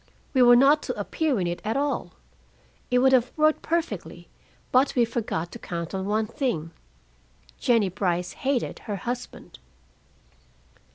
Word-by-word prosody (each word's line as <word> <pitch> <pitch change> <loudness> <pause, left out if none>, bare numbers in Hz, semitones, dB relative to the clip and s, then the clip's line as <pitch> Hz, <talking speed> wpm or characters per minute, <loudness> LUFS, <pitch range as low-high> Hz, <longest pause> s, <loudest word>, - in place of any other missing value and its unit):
We 260 - +4
were 245 0 +8
not 280 +4 +5
to - - -5
appear 305 -8 -1
in 180 - 0
it 175 0 -3
at 220 +4 -1
all. 285 0 -2 0.8
It 250 - +2
would 265 +1 +5
have 250 -1 +3
worked 310 0 +3
perfectly, 335 0 -3 0.4
but 260 +2 +3
we 240 -2 +4
forgot 210 -8 -3
to - - -9
count 170 0 -5
on 190 0 -3
one 215 +1 +1
thing 215 - -3 0.9
Jennie 230 -5 +3
Brice 180 -2 -1
hated 265 -2 -2
her 205 - -1
husband." 245 +5 -6
240 Hz, 150 wpm, -25 LUFS, 190-270 Hz, 0.9 s, were